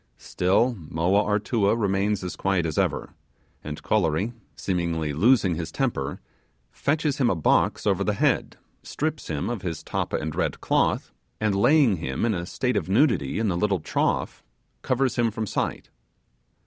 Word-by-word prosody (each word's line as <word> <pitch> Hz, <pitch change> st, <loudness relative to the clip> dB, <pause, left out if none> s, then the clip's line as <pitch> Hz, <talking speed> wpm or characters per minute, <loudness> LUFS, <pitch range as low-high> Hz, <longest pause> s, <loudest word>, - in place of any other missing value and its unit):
Still 110 Hz, +7 st, +1 dB
Moa 85 Hz, +6 st, +1 dB
Artua 105 Hz, 0 st, +1 dB
remains 100 Hz, -1 st, 0 dB
as 90 Hz, -, -4 dB
quiet 95 Hz, -3 st, 0 dB
as 80 Hz, -2 st, -1 dB
ever; -, -, -1 dB, 0.5 s
and 75 Hz, 0 st, -7 dB
Kolory, 100 Hz, +2 st, +1 dB, 0.2 s
seemingly 85 Hz, -5 st, -1 dB
losing 95 Hz, -, +4 dB
his 80 Hz, -1 st, -4 dB
temper, 75 Hz, -, -2 dB, 0.5 s
fetches 150 Hz, -1 st, -1 dB
him 125 Hz, -3 st, +3 dB
a 95 Hz, -, +1 dB
box 80 Hz, -, +2 dB
over -, -, +2 dB
the -, -, 0 dB
head, -, -, +1 dB, 0.2 s
strips 155 Hz, +1 st, -3 dB
him 75 Hz, -3 st, -2 dB
of 120 Hz, -5 st, -3 dB
his 85 Hz, -5 st, -4 dB
tappa -, -, -2 dB
and 80 Hz, 0 st, -3 dB
red -, -, -1 dB
cloth, -, -, +1 dB, 0.3 s
and 110 Hz, -2 st, +1 dB
laying 115 Hz, -, +4 dB
him 65 Hz, +4 st, -2 dB
in 115 Hz, -, +1 dB
a 85 Hz, -2 st, -3 dB
state 125 Hz, +2 st, -1 dB
of 90 Hz, -3 st, -2 dB
nudity 100 Hz, -, +2 dB
in 110 Hz, -2 st, +1 dB
a -, -, -1 dB
little 95 Hz, +1 st, +1 dB
trough, 75 Hz, -, -1 dB, 0.4 s
covers 130 Hz, 0 st, 0 dB
him 120 Hz, -1 st, +3 dB
from 110 Hz, 0 st, -3 dB
sight. -, -, -3 dB
100 Hz, 160 wpm, -25 LUFS, 85-115 Hz, 0.5 s, losing